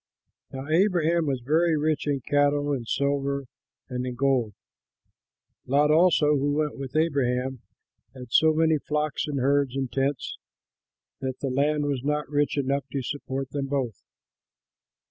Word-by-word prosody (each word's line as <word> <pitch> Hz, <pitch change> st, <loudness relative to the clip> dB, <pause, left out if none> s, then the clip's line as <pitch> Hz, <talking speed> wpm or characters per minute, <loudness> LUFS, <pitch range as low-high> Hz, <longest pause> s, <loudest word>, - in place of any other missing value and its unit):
Now 135 Hz, +1 st, -6 dB
Abraham 170 Hz, -1 st, +2 dB
was 135 Hz, -3 st, -1 dB
very 160 Hz, +3 st, +3 dB
rich 150 Hz, 0 st, 0 dB
in 140 Hz, -2 st, 0 dB
cattle, 145 Hz, +1 st, +1 dB
in 125 Hz, -4 st, -3 dB
silver, 140 Hz, +1 st, -1 dB, 0.4 s
and 125 Hz, -1 st, -3 dB
in 125 Hz, -1 st, -4 dB
gold; 125 Hz, -5 st, +1 dB, 1.1 s
Lot 145 Hz, +3 st, +3 dB
also, 155 Hz, -2 st, +4 dB
who 145 Hz, +1 st, 0 dB
went 150 Hz, -1 st, -1 dB
with 135 Hz, 0 st, -7 dB
Abraham, 130 Hz, -5 st, 0 dB, 0.5 s
had 125 Hz, -2 st, -10 dB
so 160 Hz, +4 st, +5 dB
many 160 Hz, -1 st, +2 dB
flocks 150 Hz, +1 st, -2 dB
and 145 Hz, -2 st, -2 dB
herds 140 Hz, 0 st, +1 dB
and 135 Hz, -2 st, -2 dB
tents 135 Hz, -1 st, -2 dB, 0.8 s
that 130 Hz, -1 st, -4 dB
the 135 Hz, -, -2 dB
land 145 Hz, +3 st, +1 dB
was 140 Hz, -3 st, -2 dB
not 150 Hz, +1 st, -1 dB
rich 145 Hz, 0 st, +1 dB
enough 140 Hz, 0 st, 0 dB
to 135 Hz, -2 st, -2 dB
support 135 Hz, -1 st, -4 dB
them 140 Hz, -1 st, -2 dB
both. 130 Hz, -7 st, -2 dB
140 Hz, 145 wpm, -26 LUFS, 135-150 Hz, 1.1 s, so